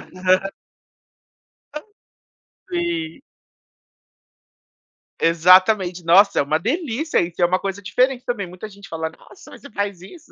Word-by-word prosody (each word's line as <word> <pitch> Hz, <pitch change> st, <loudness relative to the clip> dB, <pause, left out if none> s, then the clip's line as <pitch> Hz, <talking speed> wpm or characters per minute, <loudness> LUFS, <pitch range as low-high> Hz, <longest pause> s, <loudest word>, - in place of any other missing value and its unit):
Aham. 185 Hz, +1 st, +1 dB, 1.2 s
Ah, 300 Hz, -, -6 dB, 0.9 s
Sim. 345 Hz, -2 st, -3 dB, 2.0 s
Exatamente, 180 Hz, +2 st, +4 dB
nossa, 195 Hz, +5 st, +5 dB
é -, -, +4 dB
uma 150 Hz, +2 st, 0 dB
delícia 305 Hz, -, -1 dB
isso, 170 Hz, +1 st, -5 dB
é 175 Hz, -, +6 dB
uma 185 Hz, +2 st, +1 dB
coisa 195 Hz, 0 st, -5 dB
diferente 250 Hz, +5 st, 0 dB
também, 205 Hz, -6 st, -3 dB
muita 180 Hz, +4 st, -9 dB
gente 200 Hz, -1 st, -15 dB
fala: 160 Hz, -1 st, -4 dB
“Nossa, 370 Hz, -, -17 dB
você 280 Hz, -, -13 dB
faz 200 Hz, -3 st, -4 dB
isso?”, 300 Hz, -, -15 dB
195 Hz, 120 wpm, -21 LUFS, 180-250 Hz, 2.0 s, é